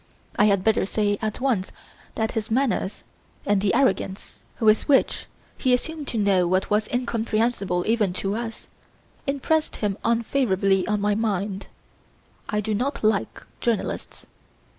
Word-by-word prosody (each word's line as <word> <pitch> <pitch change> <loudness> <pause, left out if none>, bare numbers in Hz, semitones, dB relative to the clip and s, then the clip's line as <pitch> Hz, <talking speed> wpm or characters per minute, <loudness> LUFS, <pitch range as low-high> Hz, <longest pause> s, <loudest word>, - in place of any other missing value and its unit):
I 210 - +4
had 200 -3 +3
better 220 +1 +3
say 205 -1 0
at 215 -1 -2
once 235 -9 0 0.4
that 220 0 0
his 220 -1 -3
manners, 235 -4 0 0.4
and 205 -1 +2
the 205 +2 +2
arrogance 240 -7 0 0.2
with 215 -1 +3
which 280 -3 +2 0.3
he 255 -2 +4
assumed 310 +3 -5
to 230 - -2
know 195 -4 +3
what 185 +3 0
was 210 +1 +2
incomprehensible 225 -6 0
even 220 -4 +2
to 195 +2 -2
us, 230 0 -5 0.6
impressed 305 +3 0
him 205 -2 -2
unfavourably 220 -5 +1
on 210 -1 0
my 205 0 +2
mind. 205 -2 -2 0.8
I 210 0 0
do 215 +1 -2
not 255 +6 -2
like 215 -2 0 0.2
journalists. 235 -3 -2
215 Hz, 140 wpm, -24 LUFS, 200-235 Hz, 0.8 s, I